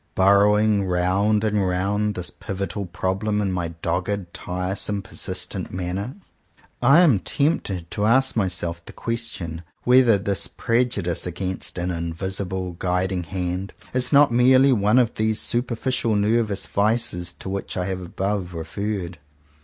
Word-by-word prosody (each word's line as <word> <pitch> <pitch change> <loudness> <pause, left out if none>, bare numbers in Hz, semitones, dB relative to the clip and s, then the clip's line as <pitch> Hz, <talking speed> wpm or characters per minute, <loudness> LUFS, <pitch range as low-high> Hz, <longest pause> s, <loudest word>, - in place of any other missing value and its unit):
Burrowing 100 +1 +4
round 95 +4 +2
and 105 -3 +1
round 100 +3 0
this 90 -1 -4
pivotal 100 -1 -4
problem, 95 +4 -1
in 100 -2 0
my 90 -2 -1 0.2
dogged, 90 -1 -2
tiresome, 95 +3 -3
persist - - -5
ent - - -5
manner, 95 +6 -4 0.7
I 140 +7 +7
am 140 - +5
tempted 100 - -1
to 105 - -1
ask 130 +3 +3
myself 85 -4 -1
the - - -12
question 115 -8 -4 0.2
whether 125 -3 +5
this 100 -1 -1
prejudice 110 -9 0
against 90 +1 -4
an 90 +1 -1
invisible 90 +2 -3
Guiding 90 0 0
Hand 90 +2 -3 0.2
is 125 0 +1
not 145 -2 +6
merely 130 +3 +5
one 105 +1 +3
of 120 -3 +3
those 110 0 0
superficial 120 -1 -1
nervous 105 -1 +1
vices 100 -5 0
to - - -8
which 95 0 -4
I 90 - -1
have 95 -1 -3
above 95 0 -3
referred. 90 +1 -4
100 Hz, 140 wpm, -23 LUFS, 90-110 Hz, 0.7 s, I